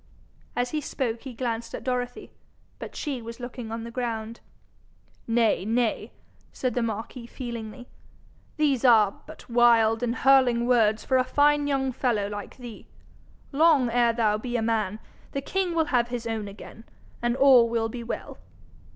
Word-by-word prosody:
As 245 0 -1
he 305 - -1
spoke 235 -5 -3
he 265 - -8
glanced 230 -1 -3
at - - -8
Dorothy, 250 -1 -3 0.5
but - - -8
she 275 -5 -4
was 230 +2 -9
looking 245 -2 -7
on 225 0 -4
the 235 - -7
ground. 230 -2 -4 0.9
'Nay, 230 -4 +2
nay!' 230 +2 -1 0.4
said 255 -2 -2
the 245 - 0
marquis 230 +2 -4
feelingly. 235 -1 -7 0.7
'These 285 -5 +1
are, 220 -6 +4
but - - -12
wild 230 -2 +4
and 240 0 -1
hurling 255 -4 +4
words 225 -3 +2
for 260 - +2
a 255 - +3
fine 290 +2 +2
young 270 -2 0
fellow 235 -5 0
like 205 -1 -7
thee. 240 -4 -10 0.6
Long 290 -4 +4
ere 240 0 +3
thou 215 -2 +1
be 240 +2 -3
a - - -1
man, 215 -3 0 0.4
the 275 - -2
king 365 +3 -2
will 325 -1 +2
have 240 -1 +3
his 240 -1 -5
own 220 -2 -3
again, 205 +2 -11 0.4
and 240 0 0
all 260 -3 +6
will 230 -1 0
be 235 +1 -7
well. 230 - -6
240 Hz, 165 wpm, -26 LUFS, 225-255 Hz, 0.9 s, all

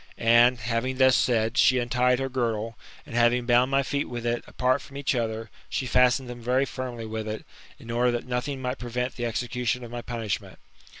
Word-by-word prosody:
And, 120 +2 +5
having 115 +3 -2
thus 130 -1 +5
said, 115 0 +1
she 130 - +5
untied 125 +1 +2
her 135 +1 -2
girdle, 115 -3 -2 0.3
and, - - -11
having 120 +1 +3
bound 120 +1 +4
my 135 0 +2
feet 140 +1 -2
with 120 -1 -5
it, 120 0 -1
apart 130 +2 +1
from 140 - -11
each 140 -1 0
other, 115 -2 -3 0.2
she 130 - -2
fastened 125 +1 +3
them 120 -1 -8
very 125 +3 +2
firmly 125 -4 -6
with 110 0 -4
it, 110 0 -5 0.3
in 115 - -9
order 120 +1 +2
that 120 -1 -2
nothing 130 +2 -3
might 125 +1 -2
prevent 125 +1 -3
the 120 -1 -2
execution 120 +1 -2
of 120 - -9
my 120 0 -5
punishment. 115 -4 -4
120 Hz, 200 wpm, -26 LUFS, 115-125 Hz, 0.3 s, And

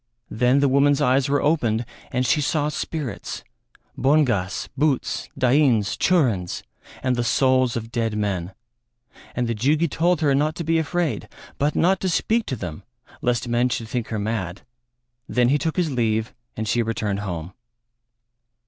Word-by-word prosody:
Then 125 +4 +3
the 140 - +4
woman's 140 +1 +3
eyes 130 +1 +2
were 145 0 +1
opened 120 -7 +1 0.3
and 125 +1 0
she 150 - +2
saw 150 +1 0
spirits 150 -2 -5 0.5
bongas, 125 -10 +1
bhuts, 145 -1 0
dains, 130 -5 +3
churins, 120 - +1 0.4
and 130 -1 +1
the 120 - 0
souls 130 0 +2
of 115 0 -6
dead 115 -3 -1
men; 95 -3 -2 0.8
and 125 -1 0
the 115 - 0
Jugi 145 +9 +2
told 170 +2 +1
her 145 -3 +3
not 150 +3 +1
to 170 - -4
be 165 +1 +2
afraid, 165 0 -1 0.3
but 145 +2 +1
not 185 +2 +3
to 190 - -1
speak 225 +6 +1
to 130 - -2
them 90 -6 -6 0.4
lest 120 0 0
men 120 +1 +2
should 115 -2 -3
think 120 -3 -2
her 110 - -3
mad; 100 -4 -3 0.7
then 125 -1 +3
he 145 +2 +3
took 160 +3 -2
his 170 -4 +1
leave, 110 -3 0 0.2
and 110 0 -3
she 120 +3 +2
returned 110 -3 -2
home. 90 -3 -5
125 Hz, 160 wpm, -23 LUFS, 110-150 Hz, 0.8 s, the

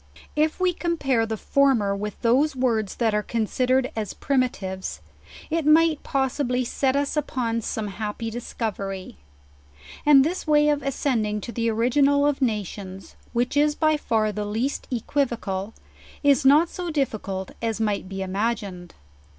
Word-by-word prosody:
If 305 +3 +1
we 370 -1 +2
compare 275 -10 0
the 220 0 -3
former 240 -7 +2
with 210 0 -5
those 265 +5 +3
words 230 -6 0
that 225 -3 +1
are 210 - +2
considered 255 +4 0
as 215 -3 -4
primitives, 225 -9 -2 0.5
it 330 0 +1
might 310 +1 +4
possibly 260 -2 0
set 265 +2 0
us 285 +1 0
upon 240 -6 -1
some 215 0 -3
happy 215 +2 -4
discovery. 200 -5 -5 0.9
And 280 -2 +7
this 345 +1 -3
way 300 0 +4
of 295 -1 +1
ascending 240 -6 -1
to 235 - -6
the 230 -1 0
origin 245 +5 +3
al 285 0 +3
of 290 -1 +1
nations, 200 -5 -3 0.2
which 245 +3 0
is 295 +1 +3
by 310 0 +3
far 220 -7 0
the 210 0 -3
least 225 +7 -2
equivocal, 230 -6 -2 0.5
is 280 -2 +4
not 295 +5 +6
so 355 -1 -5
difficult 215 - -2
as 225 -1 -1
might 205 -4 -1
be 195 0 -4
imagined. 195 -2 -3
240 Hz, 150 wpm, -24 LUFS, 210-285 Hz, 0.9 s, And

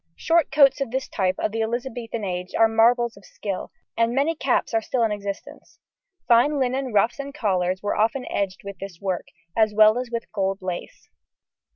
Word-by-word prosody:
Short 330 -2 +2
coats 280 -1 +5
of 275 - -1
this 260 +2 -3
type 185 -2 0
of - - -1
the 225 +1 -2
Elizabethan 235 0 -3
age 180 -1 -4
are 225 - +6
marvels 235 +1 +3
of 200 - -16
skill, 195 -2 -5 0.2
and 230 +1 +1
many 285 +4 +2
caps 265 -4 0
are 225 - +2
still 240 +2 -1
in 225 - +1
existence. 200 -1 -7 0.5
Fine 245 +5 +4
linen 260 0 -1
ruffs 220 +5 +2
and 280 0 -6
collars 185 -6 0
were 205 - 0
often 225 +5 +1
edged 195 -2 -2
with 200 -2 -8
this 195 -3 -8
work, 190 -3 -3 0.3
as 220 -2 +2
well 215 +2 +6
as 250 -1 -5
with 235 -1 -5
gold 195 -2 -1
lace. 180 -2 -6
225 Hz, 190 wpm, -24 LUFS, 200-250 Hz, 0.5 s, are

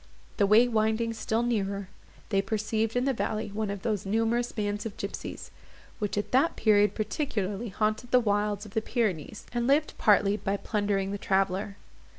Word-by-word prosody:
The 200 - +3
way 220 +4 +6
winding 225 0 +1
still 225 +1 -1
nearer, 200 -4 -1 0.4
they 195 -2 +2
perceived 220 +2 -1
in 245 +1 +1
the 270 - +2
valley 220 -2 -2
one 210 +1 -3
of 200 -2 -5
those 210 -4 -1
numerous 225 +4 0
bands 205 -1 -2
of 220 -3 -6
gipsies, 200 - -6 0.5
which 210 -2 -2
at 205 - -2
that 270 +6 +3
period 210 -1 +3
particularly 215 -2 -2
haunted 215 +4 -1
the 250 - +5
wilds 205 -2 0
of 200 - -12
the 220 - +1
Pyrenees, 215 -5 -2
and 240 0 0
lived 295 +3 +3
partly 205 -1 +4
by 200 -1 -1
plundering 200 -2 -1
the 200 - -4
traveller. 195 +1 0
215 Hz, 170 wpm, -28 LUFS, 200-230 Hz, 0.5 s, way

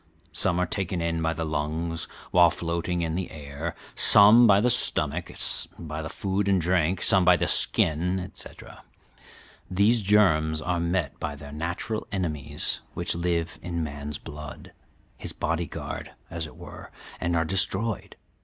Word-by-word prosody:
Some 85 +2 0
are 90 - +1
taken 90 0 -3
in 85 0 -2
by 80 0 0
the 80 0 -4
lungs, 80 +2 -3 0.2
while 90 -1 +6
floating 85 +1 -3
in 80 -1 -2
the 90 +1 -3
air; 75 +2 -7 0.2
some 110 +4 +8
by 100 -1 +5
the 120 +4 +3
stomach, 75 -2 0 0.5
by 80 -1 -6
the 80 - -6
food 100 +1 -2
and 95 -2 +3
drink; 90 +1 0
some 95 -1 +4
by 90 0 +5
the - - -1
skin, 90 +4 +4
etc. 90 +1 -9 0.9
"These 105 +5 +3
germs 85 -7 +3
are 90 +3 -2
met 85 -3 -2
by 75 - -4
their 70 0 -11
natural 85 +8 -4
enemies 75 -7 -2 0.2
which 85 0 -1
live 85 -1 -2
in 85 -1 -3
man's 75 -1 -6
blood 75 0 -10 0.4
his - - -4
body 85 +1 -2
guard, - - -7 0.2
as 85 -2 -5
it - - -15
were - - -11 0.3
and 85 0 -1
are 80 -1 +1
destroyed. 95 +4 -1
85 Hz, 155 wpm, -25 LUFS, 80-95 Hz, 0.9 s, some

